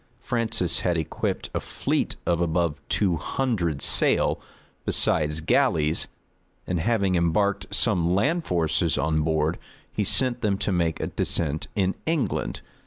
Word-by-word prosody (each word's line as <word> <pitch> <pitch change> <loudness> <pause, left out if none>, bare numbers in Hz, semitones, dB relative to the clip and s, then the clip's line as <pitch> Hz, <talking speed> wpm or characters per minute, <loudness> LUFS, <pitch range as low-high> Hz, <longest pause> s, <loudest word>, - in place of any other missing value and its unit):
Francis 115 -8 0
had 85 -1 0
equipped 80 - -3
a - - 0
fleet - - -2
of 85 -1 +1
above 85 -2 0
two 95 -5 +1
hundred 85 - -2
sail, - - +3 0.4
besides 75 0 +1
galleys; 75 0 +2 0.6
and 90 - -2
having 100 0 +1
embarked 90 +4 +1
some 85 0 +2
land 160 - +1
forces 80 - 0
on 80 -1 +1
board, 80 +1 0 0.3
he 105 - 0
sent 125 +4 +2
them 100 -3 +1
to 100 - -1
make 85 -3 0
a - - -2
descent 75 -2 -1
in 95 -2 +1
England. 145 - -1
85 Hz, 135 wpm, -25 LUFS, 80-100 Hz, 0.6 s, sail